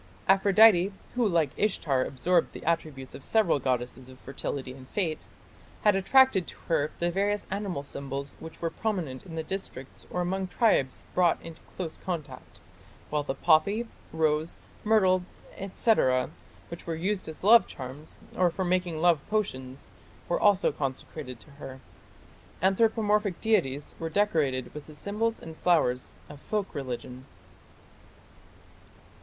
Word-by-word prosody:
Aphrodite, 195 0 +6 0.2
who 245 -3 +2
like 165 -7 +2
Ishtar 150 -10 +1
absorbed 170 +7 +1
the - - -9
attributes 155 -5 -2
of 140 - -10
several 210 -10 +3
goddesses 125 0 -2
of 130 - -13
fertility 135 -1 -5
and 130 0 -13
fate, 170 -6 -2 0.6
had 210 -2 +5
attached 200 -1 +4
to - - -8
her 155 -2 +2
the 175 0 0
various 205 +3 0
animal 195 -7 -3
symbols 140 0 -5
which 160 +1 -10
were 165 - 0
prominent 180 - -3
in 165 - -8
districts 155 -8 -6
or 180 - -2
among 190 +2 -1
tribes 180 - +2
brought 175 -2 +3
into 165 -1 -10 0.2
close 165 -4 -4
contact, 170 -6 -6 0.5
while 150 0 +1
the 140 -2 -3
poppy, 190 - +3 0.2
rose, 155 0 0 0.3
myrtle, 190 -4 +4 0.5
&c., 230 - +4 0.8
which 170 0 -9
were 165 - -1
used 185 +2 -2
as 160 - -9
love 225 +4 +7
charms, 135 +4 -9
or 180 -1 +4
for 185 +2 -3
making 180 -2 0
love 170 -3 +4
potions, 130 -12 -3 0.4
were 175 - 0
also 205 -2 +4
consecrated 135 -2 -5
to 150 - -15
her. 130 0 -8 0.8
Anthropomorphic 210 -1 +2
deities 155 -11 0
were 165 - -3
decorated 155 -10 +1
with 150 -1 -9
the 155 - -12
symbols 215 +7 -2
and 160 -1 -9
flowers 150 -8 +1
of 145 -1 -11
folk 210 -2 -2
religion. 130 -2 -6
170 Hz, 140 wpm, -28 LUFS, 140-195 Hz, 0.8 s, love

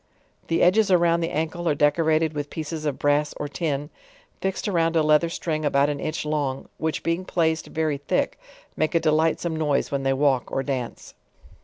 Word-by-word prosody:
The 165 - +2
edges 200 +4 +4
around 170 -2 +4
the 165 0 -1
an 160 0 -1
kle 175 0 -3
are 150 - +2
decorated 155 +2 +2
with 145 -1 -4
pieces 155 0 -5
of 140 - -2
bra^s 145 +1 +1
or 145 - -3
tin, 145 -1 -3 0.5
fixed 190 +1 -2
around 165 -4 +1
a 160 - +4
leather 155 +2 +4
string 155 -2 -3
about 140 -1 +3
an 145 - -4
inch 155 0 -3
long, 145 -3 -2
which 160 0 -2
being 165 +3 0
placed 165 -3 0
very 155 -3 -1
thick, 145 - -1 0.4
make 155 +2 0
a - - +5
delightsome 160 +1 +1
noise 150 -3 0
when 140 -1 -1
they 135 0 +1
walk 135 -2 +1
or 135 - -1
dance. 130 -4 -4
155 Hz, 190 wpm, -24 LUFS, 145-165 Hz, 0.5 s, a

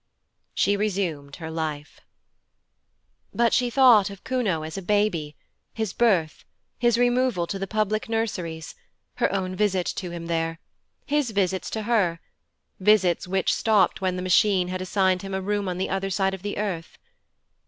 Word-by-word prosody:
She 200 - +2
resumed 180 -9 -2
her 160 -2 -7
life. 155 -2 -5 1.4
But 235 0 +3
she 245 -1 +2
thought 240 -6 +6
of 200 -1 -11
Kuno 215 -12 -1
as 155 0 -6
a 195 - -4
baby, 180 -6 0 0.4
his 220 -4 -2
birth, 180 -11 +1 0.4
his 240 -1 +3
removal 245 -6 +2
to 195 +3 -5
the 195 - -3
public 215 +3 -1
nurseries, 180 -8 -3 0.4
her - - +1
own 190 -1 -2
visit 190 -3 +1
to 185 -2 -4
him 170 -1 -6
there, 165 -1 -1 0.5
his 295 -3 0
visits 190 -3 -1
to 220 - -4
her 205 -7 +1 0.6
visits 190 -4 +3
which 190 0 +1
stopped 200 -5 +2
when 185 -1 0
the 180 - -4
Machine 185 -1 +3
had 185 0 -3
assigned 185 -1 +1
him 195 -1 -5
a - - -1
room 205 0 -1
on 180 - -3
the 190 - -2
other 195 0 -1
side 195 0 0
of 190 - -6
the 205 +1 -4
earth. 190 -6 -4
195 Hz, 165 wpm, -25 LUFS, 175-215 Hz, 1.4 s, thought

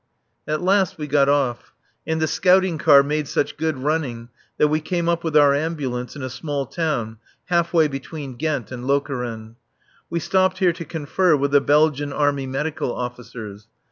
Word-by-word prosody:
At 155 +3 -2
last 190 -1 +2
we 150 - -4
got 140 -1 +3
off; 135 -4 0 0.3
and 160 0 0
the 160 - +2
scouting 185 +1 +2
car 140 -2 +6
made 150 +1 -2
such - - -1
good 160 -2 -2
running 130 -5 -2 0.3
that 150 - +4
we 155 +1 0
came 170 +1 -2
up 170 0 0
with 160 -2 +1
our 145 -1 +6
Ambulance 140 -5 -3
in 140 - -7
a 130 - -3
small 145 -2 -3
town 120 -8 -3 0.3
half 170 -1 +1
way 160 -3 +4
between 135 0 -7
Ghent 145 -4 -2
and 125 0 -6
Lokeren. 125 -5 -2 0.5
We 170 - -1
stopped 185 +2 +1
here 185 -3 +3
to 170 -1 -8
confer 160 +3 +1
with 140 0 0
the 145 0 +5
Belgian 145 -1 +2
Army 140 -1 0
Medical 135 0 -2
officers. 115 -4 -7
145 Hz, 175 wpm, -22 LUFS, 130-160 Hz, 0.5 s, car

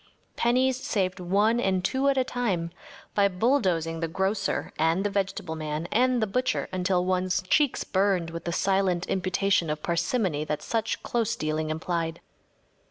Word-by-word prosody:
Pennies 255 +2 +2
saved 190 -8 -1
one 205 +6 +2
and 190 -4 +1
two 270 +6 +2
at 275 - +1
a 260 - +4
time 200 -10 -2 0.4
by 200 -1 +4
bulldozing 180 - +1
the 165 - -1
grocer 190 +3 -1
and 165 +4 +2
the 205 - -1
vegetable 190 -4 -2
man 155 +1 -3
and 250 0 +3
the - - +3
butcher 250 +5 -1
until 180 -1 +1
one’s 185 0 0
cheeks 280 +8 +2
burned 190 -4 +1
with 165 0 -7
the 170 - -1
silent 190 -1 +1
imputation 190 -2 +1
of 150 0 -3
parsimony 170 - 0
that 150 -1 -3
such 225 -1 -2
close 230 -3 0
dealing 155 0 -2
implied. 165 +1 -2
185 Hz, 160 wpm, -27 LUFS, 170-220 Hz, 0.4 s, a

